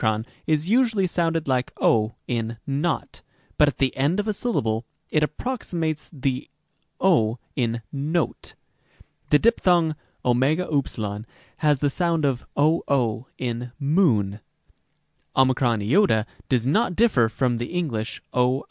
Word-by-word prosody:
o 110 0 +1 0.2
is 155 +1 +1
usually 225 -3 +3
sounded 165 -3 0
like 130 -1 0
ὁ 110 0 +2
in 115 -1 -2
not, 145 +3 -2 0.4
but 150 - +7
at 145 - -1
the 135 -2 +1
end 145 +9 +1
of 210 - -1
a 215 - +1
syllable 115 - -1 0.3
it 155 - +2
approximates 160 - -3
to 145 -6 -15
the 130 -1 -1 0.5
o 120 - +3 0.2
in 115 -4 -1
note. 155 +4 -2 0.7
The 150 - +6
diphthong 175 -6 +3 0.3
ov 125 0 +3 1.2
has 150 -2 +3
the 145 +2 +1
sound 170 -1 0
of 130 -3 -1
00 135 -6 +1
in 120 -1 -4
moon; 135 - +2 1.0
ot 125 - +3 0.2
does 125 -3 +2
not 180 - +2
differ 165 - +3
from 120 +1 0
the 120 - -3
English 145 -11 -3
οὐ. 125 +1 +2
140 Hz, 130 wpm, -24 LUFS, 120-170 Hz, 1.2 s, but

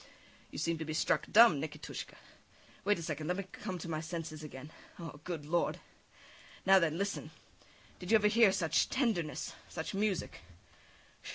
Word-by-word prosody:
You - - -9
seem 165 +1 0
to - - -2
be 155 0 -4
struck - - +1
dumb, 210 -10 +7
Nikitushka. 155 - -6 0.7
Wait 205 +1 +3
a 170 - -6
second, 155 -1 -3
let 180 +1 0
me 195 - -2
come 190 -4 -5
to 170 - -7
my 155 -2 -2
senses 160 -1 -5
again. 145 0 -9 0.3
Oh! 165 -4 -8
Good 165 -5 -4
Lord! 170 +3 0 0.9
Now 190 0 +7
then, 165 -2 +1
listen! 200 +1 -2 0.7
Did 180 - -8
you 225 - +6
ever 210 -1 +4
hear 220 -1 +6
such 185 -4 +2
tenderness, 225 - -1 0.2
such 160 - -5
music? 200 -2 -1
170 Hz, 165 wpm, -33 LUFS, 155-200 Hz, 0.9 s, dumb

